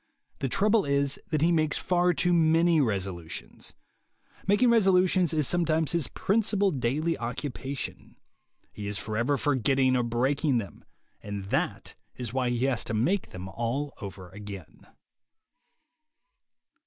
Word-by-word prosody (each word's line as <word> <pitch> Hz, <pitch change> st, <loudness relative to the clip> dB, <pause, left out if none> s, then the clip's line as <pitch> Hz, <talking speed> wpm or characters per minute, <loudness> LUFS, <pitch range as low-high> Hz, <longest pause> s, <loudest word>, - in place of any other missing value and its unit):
The 135 Hz, -, -1 dB
trouble 210 Hz, -, +3 dB
is 140 Hz, 0 st, 0 dB
that 155 Hz, -2 st, 0 dB
he 170 Hz, -, +4 dB
makes 155 Hz, -3 st, +2 dB
far 180 Hz, 0 st, +2 dB
too 175 Hz, +1 st, +1 dB
many 165 Hz, 0 st, +4 dB
resolutions. 90 Hz, -, -4 dB, 0.7 s
Making 225 Hz, +5 st, +4 dB
resolutions 185 Hz, -5 st, +4 dB
is 155 Hz, -4 st, +1 dB
sometimes 165 Hz, -3 st, +1 dB
his 170 Hz, -6 st, 0 dB
principal 205 Hz, -, +1 dB
daily 150 Hz, +5 st, 0 dB
occu 120 Hz, +4 st, -4 dB
pation. 135 Hz, +2 st, -7 dB, 0.6 s
He 105 Hz, -, -7 dB
is 105 Hz, 0 st, -2 dB
forever 115 Hz, +8 st, -1 dB
forgetting 130 Hz, -1 st, +2 dB
or 125 Hz, -, +2 dB
breaking 130 Hz, +4 st, +1 dB
them, 100 Hz, -5 st, -6 dB, 0.4 s
and 100 Hz, -1 st, -6 dB
that -, -, -1 dB, 0.2 s
is 120 Hz, -2 st, -6 dB
why 130 Hz, -2 st, 0 dB
he 120 Hz, +1 st, 0 dB
has 130 Hz, -4 st, 0 dB
to 110 Hz, -, -3 dB
make 175 Hz, -, 0 dB
them 90 Hz, +1 st, -8 dB
all 120 Hz, +8 st, -3 dB
over 95 Hz, -3 st, -8 dB
again. 100 Hz, -3 st, -10 dB
140 Hz, 135 wpm, -27 LUFS, 115-170 Hz, 0.7 s, he